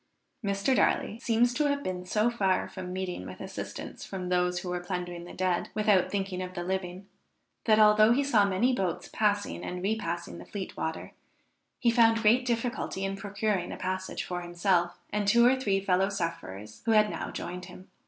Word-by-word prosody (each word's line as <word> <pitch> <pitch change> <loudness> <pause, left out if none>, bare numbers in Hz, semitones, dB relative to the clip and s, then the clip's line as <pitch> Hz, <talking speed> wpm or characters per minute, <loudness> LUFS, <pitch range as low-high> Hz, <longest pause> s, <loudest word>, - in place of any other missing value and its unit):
Mr. 200 +6 +1
Darley 225 - +1
seems 240 0 +2
to 300 +4 +1
have 285 0 0
been 180 -1 -4
so 215 +5 +2
far 195 -5 +1
from 180 - -7
meeting 185 -1 -4
with - - -9
assistance - - -7
from 185 -2 -5
those 180 0 +1
who 180 - -5
were 180 0 -1
plundering 175 -1 -5
the - - -10
dead, 185 -2 0
without 210 -4 +3
thinking 195 -2 -2
of 185 0 -6
the 175 - -3
living, 185 +1 -3 0.6
that 215 -2 +5
although 215 +1 +6
he 270 +4 +3
saw 235 -7 +4
many 200 +6 +2
boats 185 -7 -2
passing 205 -1 0
and 180 0 -5
repassing 190 -5 -2
the - - -9
Fleet 200 -2 -6
water, 160 0 -4 0.7
he 235 - +3
found 225 -1 +5
great 240 +4 +5
difficulty 235 -4 -1
in 195 0 -2
procuring 200 -1 -2
a - - -6
passage 185 0 -3
for 180 -1 -4
himself 175 0 +1 0.2
and 205 -1 0
two 235 +4 +6
or 250 +2 +6
three 205 -7 +1
fellow 190 0 +2
sufferers 135 - -5
who 225 - +3
had 210 -1 +5
now - - -4
joined 180 +1 -6
him. 185 +1 -12
195 Hz, 190 wpm, -29 LUFS, 180-215 Hz, 0.7 s, although